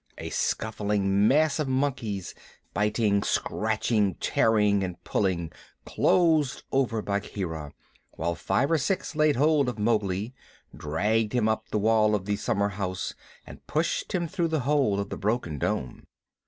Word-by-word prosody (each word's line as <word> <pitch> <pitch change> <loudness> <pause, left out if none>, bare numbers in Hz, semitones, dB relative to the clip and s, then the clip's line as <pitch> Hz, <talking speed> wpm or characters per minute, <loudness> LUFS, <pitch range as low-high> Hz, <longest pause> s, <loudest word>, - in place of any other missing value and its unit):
A - - -6
scuffling 105 -2 0
mass 155 +4 +3
of 150 - 0
monkeys, 130 -8 -2 0.4
biting, 105 0 +1
scratching, 110 -3 0
tearing, 105 -3 +2
and 90 -2 -4
pulling, 90 -5 -1 0.3
closed 160 -6 +2
over 120 -5 0
Bagheera, 90 -7 -4 0.4
while 85 +1 -2
five 135 - 0
or 165 - +3
six 175 +3 -2
laid 155 -1 +3
hold 145 0 +3
of 120 - -5
Mowgli, 105 0 0 0.4
dragged 105 +8 0
him 120 -3 +2
up 110 0 -1
the - - -1
wall 105 0 +3
of 95 -2 -3
the 105 0 0
summerhouse 100 -4 -2 0.3
and - - -13
pushed - - -1
him 170 -2 0
through 170 0 -1
the 160 -3 -1
hole 130 -7 +2
of 100 0 -3
the - - -5
broken 100 - -1
dome. 60 - -3
105 Hz, 140 wpm, -27 LUFS, 100-130 Hz, 0.4 s, mass